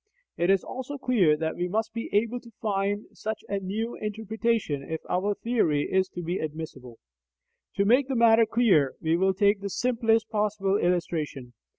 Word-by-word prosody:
It 175 +2 0
is 195 -1 +4
also 260 +3 -6
clear 205 - +3
that 160 0 -2
we 175 - -2
must 220 +4 -2
be 230 0 -4
able 230 +4 +1
to 235 - -15
find 205 -1 -1
such 220 0 -5
a 200 - -1
new 215 +5 -3
interpretation 220 -6 -2
if 160 +3 -5
our 200 +3 0
theory 195 -13 +1
is 190 0 +2
to 175 - -4
be 175 +3 -2
admissible. 150 -6 -7 0.8
To 200 - +2
make 255 +5 +4
the 270 - -2
matter 230 -1 +5
clear, 195 - +3
we 160 +1 +1
will 190 +2 +2
take 200 +1 +3
the 200 - -3
simplest 225 -1 +1
possible 210 -2 0
illustration. 160 -9 -1
200 Hz, 175 wpm, -27 LUFS, 175-225 Hz, 0.8 s, matter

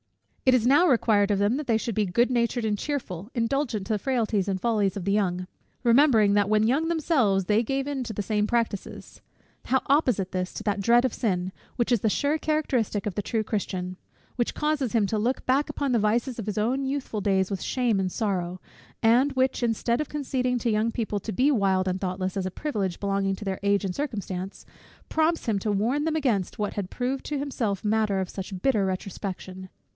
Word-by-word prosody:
It 255 - +7
is 240 -2 +2
now 290 +7 +5
required 220 - +3
of 205 - +2
them 205 +6 +2
that 300 - -5
they 230 -2 +3
should 230 +1 -3
be 210 0 +1
good 235 +8 +2
natured 235 -1 0
and 210 -1 +1
cheerful, 210 - -4
indulgent 235 -3 -1
to - - 0
the 210 - 0
frailties 225 -6 0
and 190 -1 -1
follies 205 -3 +1
of 185 - -5
the 200 - +1
young; 185 -3 0 0.4
remembering, 235 -4 +5
that 205 -1 +2
when 215 0 +3
young 290 +7 +2
themselves 275 - +2
they 210 +4 +3
gave 270 +3 -2
into 265 -5 -3
the 205 -1 -3
same 210 0 0
practices. 230 -4 -3 0.4
How 265 0 +2
opposite 250 - +2
this 185 0 -3
to - - -5
that 205 -1 0
dread 240 +5 +4
of 255 - -1
sin, 185 -5 -1 0.2
which 240 0 0
is 235 -5 +3
the 220 - +2
sure 290 +8 +1
characteristic 260 -10 0
of 205 - -2
the 205 - -2
true 220 +2 -1
Christian; 185 -4 -3 0.4
which 240 - -1
causes 300 -5 0
him 225 -3 +3
to 215 +2 -1
look 245 +5 -1
back 270 +3 +2
upon 280 -2 -2
the 235 - +3
vices 230 +4 0
of 215 - -5
his 210 - -3
own 245 +6 +1
youthful 265 -6 -3
days 190 -1 +1
with 195 - -3
shame 240 -6 0
and 185 -1 -1
sorrow; 185 -4 -2 0.4
and 250 +5 +4
which, 260 0 +1
instead 235 +2 0
of 305 - -4
conceding 260 -4 -1
to 235 -1 0
young 215 +2 +1
people 215 -3 -2
to 220 - -5
be 260 +9 +3
wild 190 -6 +2
and 185 0 -1
thoughtless, 185 0 -2
as 190 -1 -1
a - - -5
privilege 200 - -3
belonging 195 -1 0
to 210 - -9
their 190 -1 -2
age 200 0 +2
and 185 - -3
circumstances, 195 -9 -4 0.4
prompts 320 +1 +1
him 215 -4 +1
to 210 +2 -1
warn 235 +9 +1
them 320 0 0
against 235 - 0
what 210 -1 -2
had 195 -3 -4
proved 260 +2 -2
to 295 - -3
himself 230 -8 -2
matter 210 -2 +1
of 190 -1 -2
such 190 -1 -6
bitter 220 -8 +3
retrospection! 185 0 -5
220 Hz, 215 wpm, -26 LUFS, 195-255 Hz, 0.4 s, It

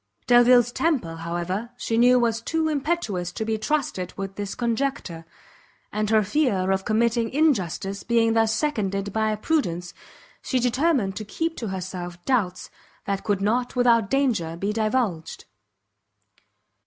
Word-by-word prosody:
Delvile's 245 0 +5
temper, 245 - -1
however, 175 +6 -3
she 230 - -2
knew 245 +2 +5
was 230 -1 0
too 320 +6 -1
impetuous 285 - -1
to 220 - -3
be 220 0 -1
trusted 215 - -2
with 195 0 -5
this 205 -1 -5
conjecture, 235 -8 -2 0.7
and 215 0 -1
her 220 -1 +4
fear 200 -6 +1
of 190 0 0
committing 230 +1 +1
injustice 200 - 0
being 230 -1 +2
thus 225 -1 +3
seconded 200 -7 -1
by 220 -1 +1
prudence, 195 - -1 0.5
she 260 - -1
determined 250 - +1
to 215 - -4
keep 325 +10 -3
to 230 - -4
herself 180 -2 -5
doubts 200 -9 -1 0.3
that 200 -1 -2
could 205 -3 0
not 245 +5 0
without 235 -4 +3
danger 225 -13 0
be 200 +4 -2
divulged. 215 -7 -1
220 Hz, 140 wpm, -24 LUFS, 195-250 Hz, 0.7 s, Delvile's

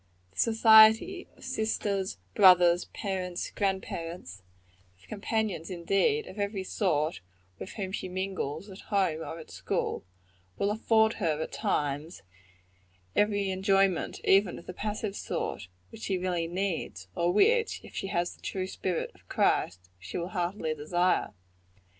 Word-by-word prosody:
The 95 - -12
society, 225 - +6
of - - -16
sisters, 200 - -1 0.2
brothers, 180 -2 +6
parents, 185 -3 -4
grand 195 -2 0
parents 165 - -7 0.6
of 95 - -21
companions, 215 -4 -2
indeed, 195 - +1
of 205 - -10
every 200 -1 -2
sort 160 - 0 0.4
with - - -7
whom 195 -3 -4
she 185 - -4
mingles, 185 -3 -3
at 195 -1 -11
home 190 -7 +1
or 165 - -6
at 160 - -11
school - - -2 0.5
will 200 - +1
afford 220 0 +3
her, 155 -4 +1
at 160 - -4
times, 145 - -2 0.9
every 205 -2 +2
enjoyment, 195 -1 +1
even 195 -1 +4
of - - -12
the 180 - -7
passive 210 0 -3
sort, - - -4 0.2
which - - -11
she 190 - -1
really 180 -2 -1
needs; 170 - -3
or 170 +1 +1
which, 460 - +3
if - - -13
she - - -3
has 175 -2 -1
the - - -24
true 185 -1 -3
spirit 185 -2 -3
of - - -25
Christ, 90 0 0
she 95 - -6
will 175 +1 -3
heartily 175 -3 -2
desire. 175 +4 +1
190 Hz, 145 wpm, -29 LUFS, 170-205 Hz, 0.9 s, society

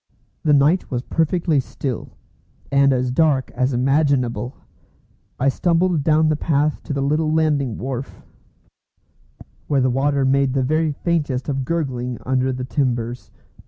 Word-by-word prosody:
The 150 - +2
night 145 +6 +3
was 125 -2 -3
perfectly 165 0 +1
still, 130 -1 -5 0.5
and 140 0 +4
as 125 -1 0
dark 140 -1 +2
as 130 +2 0
imaginable. 130 -1 +1 0.8
I 135 - +1
stumbled 170 +2 +1
down 155 +1 +3
the 155 - +2
path 150 0 0
to - - -3
the 140 -1 -1
little 155 +2 +1
landing 150 -6 +1
wharf, 130 +1 -6 1.4
where 140 - +2
the 130 0 +2
water 140 +1 +1
made 135 0 +2
the 135 -1 +1
very 155 +3 +1
faintest 145 -4 -2
of 135 -2 -2
gurgling 125 -6 -2
under 130 0 +1
the 130 0 -4
timbers. 125 -3 -2
140 Hz, 140 wpm, -21 LUFS, 130-155 Hz, 1.4 s, and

